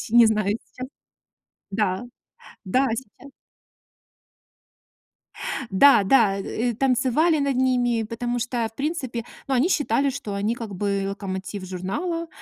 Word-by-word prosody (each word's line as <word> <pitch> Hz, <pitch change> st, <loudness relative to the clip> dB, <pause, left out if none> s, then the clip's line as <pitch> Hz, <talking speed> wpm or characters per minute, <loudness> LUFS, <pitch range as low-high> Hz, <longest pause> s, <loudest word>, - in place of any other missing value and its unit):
с -, -, -7 dB
не 235 Hz, 0 st, +7 dB
знаю 215 Hz, -1 st, +1 dB
сейчас. 255 Hz, 0 st, -9 dB, 0.8 s
Да-да, 210 Hz, +4 st, -2 dB, 0.7 s
сейчас. 260 Hz, +3 st, -8 dB, 2.4 s
Да-да! 205 Hz, -1 st, +5 dB
Э, 235 Hz, +5 st, -2 dB
танцевали 270 Hz, +6 st, +2 dB
над 280 Hz, -2 st, 0 dB
ними, 245 Hz, -3 st, +2 dB
потому 240 Hz, +2 st, -3 dB
что, 240 Hz, -1 st, -1 dB
в 225 Hz, -, -31 dB
принципе, 270 Hz, -6 st, -3 dB, 0.2 s
ну, 275 Hz, -, 0 dB
они 265 Hz, +8 st, +3 dB
считали, 280 Hz, -5 st, +2 dB
что 235 Hz, -6 st, -5 dB
они 205 Hz, +4 st, -1 dB
как 225 Hz, -4 st, -7 dB
бы 200 Hz, 0 st, -1 dB
локомотив 195 Hz, 0 st, -5 dB
журнала, 195 Hz, -, -3 dB
235 Hz, 115 wpm, -24 LUFS, 205-260 Hz, 2.4 s, не